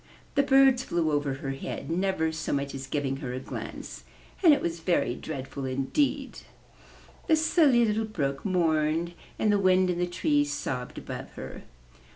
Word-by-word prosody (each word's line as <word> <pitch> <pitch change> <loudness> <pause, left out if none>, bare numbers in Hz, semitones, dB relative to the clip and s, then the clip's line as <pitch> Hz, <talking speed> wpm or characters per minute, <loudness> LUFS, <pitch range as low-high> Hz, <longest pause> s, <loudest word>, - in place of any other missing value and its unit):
The 280 - +4
birds 270 -2 +5
flew 170 -8 0
over 145 -2 0
her 135 0 -4
head, 135 +4 -5
never 180 -2 0
so 160 -1 -4
much 140 0 -1
as 135 0 -6
giving 135 -1 -1
her 130 -3 -5
a 130 - -3
glance, - - -7 0.4
and 335 - +8
it 290 - +5
was 170 0 -3
very 165 -7 +1
dread 135 -1 -6
ful 140 -2 -6
indeed. 135 - -1 0.9
The 320 - +5
Silly 305 -6 +4
Little 220 +1 0
Brook 140 -10 -2
mourned 165 -2 +1 0.2
and 215 - +2
the 205 - +3
wind 185 -1 +4
in 175 - -3
the 180 - +1
trees 145 -5 +1
sobbed 125 -3 -4
above - - -7
her. - - -8
165 Hz, 175 wpm, -28 LUFS, 140-205 Hz, 0.9 s, and